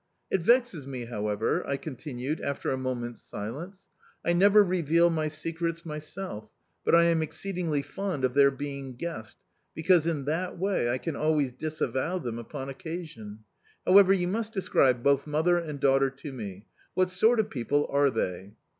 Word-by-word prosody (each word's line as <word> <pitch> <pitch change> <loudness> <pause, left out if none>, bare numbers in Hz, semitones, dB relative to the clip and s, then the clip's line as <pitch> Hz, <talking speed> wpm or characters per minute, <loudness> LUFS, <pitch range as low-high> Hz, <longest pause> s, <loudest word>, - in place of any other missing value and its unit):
It 190 - +2
vexes 230 - +2
me, 130 -3 -5
however," 105 -2 -1
I 140 - 0
continued 140 0 -5
after 140 - -2
a - - +1
moment's 125 -3 -4
silence. 160 - -7 0.4
"I 170 - +3
never 200 +4 +6
reveal 170 -2 +3
my 155 -1 0
secrets 165 +2 -3
myself, 150 - -6 0.3
but - - +4
I 170 - +7
am 170 -1 +3
exceedingly 160 -1 -2
fond 180 0 -4
of 125 - -1
their 140 0 +6
being 140 -1 -6
guessed, 120 -7 -6 0.4
because 165 0 +3
in 150 -5 -1
that 170 +6 -2
way 185 -9 0
I 120 - +1
can 160 +3 -4
always 150 -4 +1
disavow 155 +3 -2
them 120 -8 -4
upon 135 +3 -6
occasion. 135 -8 -7 0.4
However, 195 +1 +7
you 180 -2 +2
must 220 +4 -2
describe 130 - +2
both 140 +1 +3
mother 160 +4 +2
and 150 -4 -6
daughter 135 0 +4
to 135 +2 -9
me. 100 -4 -7 0.3
What 185 0 +2
sort 220 +6 +4
of 215 - 0
people 145 +4 0
are 140 0 +4
they?" 100 -4 -3
150 Hz, 165 wpm, -28 LUFS, 130-175 Hz, 0.4 s, I